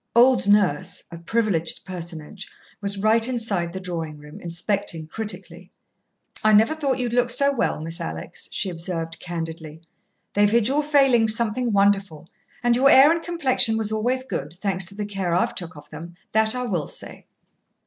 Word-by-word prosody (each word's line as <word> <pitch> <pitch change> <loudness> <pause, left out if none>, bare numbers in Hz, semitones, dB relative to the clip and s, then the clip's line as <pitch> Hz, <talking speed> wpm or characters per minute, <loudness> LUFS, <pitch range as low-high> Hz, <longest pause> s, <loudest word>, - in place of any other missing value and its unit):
Old 245 -2 +5
Nurse, 190 -3 +2
a 170 - -8
privileged 180 -3 0
personage, 175 +1 -7 0.3
was 200 0 -2
right 220 +3 +3
inside 220 -9 -1
the 190 - -6
drawing 165 -4 -5
room, 150 0 -12
inspecting 175 -1 -2
critically. 215 +6 -5 0.7
"I 215 0 +5
never 220 +8 +5
thought 280 -5 -1
you'd 245 -2 -2
look 245 0 +2
so 280 +4 +2
well, 250 - 0
Miss 165 +2 -4
Alex," 80 0 -6
she 195 - -2
observed 165 -1 -4
candidly. 160 -2 -6 0.5
"They've 205 0 +4
hid 230 0 +3
your 280 +3 +2
failings 270 -7 +4
something 235 +1 0
wonderful, 200 -6 +1 0.4
and 240 0 +4
your 270 +3 +5
hair 275 +3 +8
and 335 0 0
complexion 275 -10 +1
was 220 -1 -2
always 245 +4 0
good, 165 - -5
thanks 190 -2 0
to 200 - -11
the 210 0 -3
care 195 -4 -2
I've 180 - +1
took 175 -1 -5
of 145 0 -13
them 170 +1 -9 0.2
that 220 +2 +2
I 250 - -2
will 180 -11 -2
say." - - -7
205 Hz, 170 wpm, -23 LUFS, 170-235 Hz, 0.7 s, hair